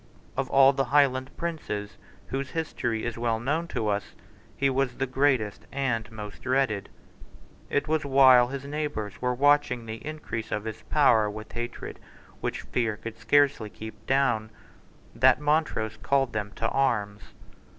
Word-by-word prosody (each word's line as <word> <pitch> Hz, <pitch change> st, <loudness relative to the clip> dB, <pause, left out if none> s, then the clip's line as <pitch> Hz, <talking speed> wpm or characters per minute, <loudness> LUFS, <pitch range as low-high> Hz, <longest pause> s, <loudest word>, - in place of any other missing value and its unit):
Of 135 Hz, -, -2 dB
all 135 Hz, 0 st, +6 dB
the 135 Hz, 0 st, 0 dB
Highland 130 Hz, -1 st, +3 dB
princes 155 Hz, -12 st, -4 dB, 0.3 s
whose 135 Hz, 0 st, -3 dB
history 120 Hz, -9 st, -2 dB
is 120 Hz, -1 st, -4 dB
well 115 Hz, -1 st, 0 dB
known 155 Hz, +8 st, -1 dB
to 110 Hz, -, -2 dB
us 100 Hz, -1 st, -2 dB, 0.4 s
he 140 Hz, -, +2 dB
was 135 Hz, -2 st, 0 dB
the 135 Hz, -, -1 dB
greatest 130 Hz, -5 st, 0 dB
and 120 Hz, -6 st, -1 dB
most 105 Hz, -2 st, -8 dB
dreaded. 130 Hz, -6 st, 0 dB, 0.8 s
It 145 Hz, +2 st, 0 dB
was 155 Hz, 0 st, +1 dB
while 130 Hz, -3 st, +6 dB
his 135 Hz, +1 st, -6 dB
neighbours 145 Hz, -9 st, -4 dB
were 125 Hz, 0 st, 0 dB
watching 140 Hz, -3 st, +3 dB
the 110 Hz, 0 st, -7 dB
increase 150 Hz, -7 st, -5 dB
of 105 Hz, -, -1 dB
his 110 Hz, -1 st, -6 dB
power 120 Hz, -8 st, +4 dB
with 110 Hz, +1 st, -8 dB
hatred 120 Hz, 0 st, -6 dB, 0.4 s
which -, -, -3 dB
fear 110 Hz, -4 st, -1 dB
could 115 Hz, +1 st, -8 dB
scarcely 135 Hz, 0 st, +3 dB
keep 110 Hz, 0 st, -10 dB
down 125 Hz, -5 st, +2 dB, 0.6 s
that -, -, +5 dB
Montrose 150 Hz, -7 st, 0 dB
called 135 Hz, -3 st, +1 dB
them 105 Hz, -1 st, -3 dB
to 115 Hz, -, -1 dB
arms. 105 Hz, -7 st, 0 dB
125 Hz, 150 wpm, -27 LUFS, 110-140 Hz, 0.8 s, all